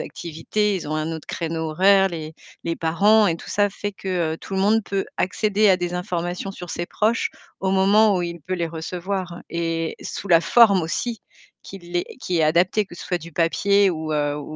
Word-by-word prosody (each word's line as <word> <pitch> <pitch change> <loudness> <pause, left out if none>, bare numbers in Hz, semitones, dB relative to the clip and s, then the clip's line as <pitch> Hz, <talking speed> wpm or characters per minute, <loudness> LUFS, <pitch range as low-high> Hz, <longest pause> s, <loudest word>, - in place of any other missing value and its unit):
activités, 195 +5 -2
ils 180 - -6
ont 155 - -3
un 155 +1 -2
autre 160 -2 -7
créneau 160 -1 -3
horaire, 195 +4 +5
les 160 -3 -7 0.3
les 165 0 -2
parents 205 +7 +4
et 165 -3 +1
tout - - -11
ça 205 0 +2
fait 205 +1 -4
que 180 -5 -2
tout 195 - -8
le 190 - 0
monde 215 +3 +3
peut 195 -1 -2
accéder 210 +3 +2
à 190 - +5
des 175 -1 -3
informations 180 +1 -3
sur 180 -3 -9
ses 175 - -3
proches 220 +5 0 0.3
au 190 - -1
moment 200 +2 +4
où 180 - -1
il 170 0 -4
peut 185 +5 -4
les 170 -2 -2
recevoir 175 +2 -4
et 165 -1 -2
sous 200 - -6
la 165 -2 +6
forme 200 0 +5
aussi, 225 +8 -3 0.4
qu'il 175 -2 -7
est 175 - +1 0.2
qui 180 -7 -1
est - - +3
adaptée, 175 +7 +2
que 185 - -13
ce - - -9
soit 180 - -1
du 170 0 -11
papier 200 +5 +3
ou, 160 -2 -4
heu, 145 -1 0
ou 150 - -5
180 Hz, 210 wpm, -22 LUFS, 165-195 Hz, 0.4 s, la